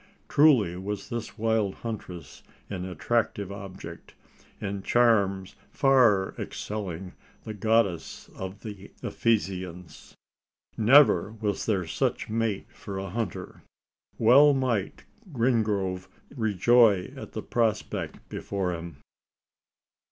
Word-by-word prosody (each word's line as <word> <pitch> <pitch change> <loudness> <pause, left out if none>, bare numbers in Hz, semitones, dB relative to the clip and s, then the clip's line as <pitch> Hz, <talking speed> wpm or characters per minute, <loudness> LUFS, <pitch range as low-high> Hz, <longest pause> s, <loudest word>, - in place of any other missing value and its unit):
Truly 125 - +4
was 100 +2 -5
this 115 -2 -5
wild 110 -3 0
huntress 100 -7 -7 0.3
an 90 -2 -4
attractive 100 +2 -1
object 95 -4 -9 0.4
in 100 -1 -4
charms 100 -5 +2 0.2
far 120 -9 +4
excelling 95 -4 -5 0.3
the 110 - -6
goddess 105 -5 0
of 95 +2 -7
the 100 -3 -9
Ephesians. 95 -6 -2 0.6
Never 110 - +5
was 105 -3 -3
there 95 -5 +1
such 80 - -2
mate 115 -3 -1
for 100 -1 -7
a 95 -1 -5
hunter! 110 -4 -5 0.6
Well 140 +6 +6
might 120 -7 -1 0.3
Wingrove 105 -7 0 0.3
rejoice 110 -2 +3
at - - -9
the - - -5
prospect 115 -3 -2
before 95 -3 -3
him! 85 -3 -7
105 Hz, 100 wpm, -27 LUFS, 95-115 Hz, 0.6 s, Well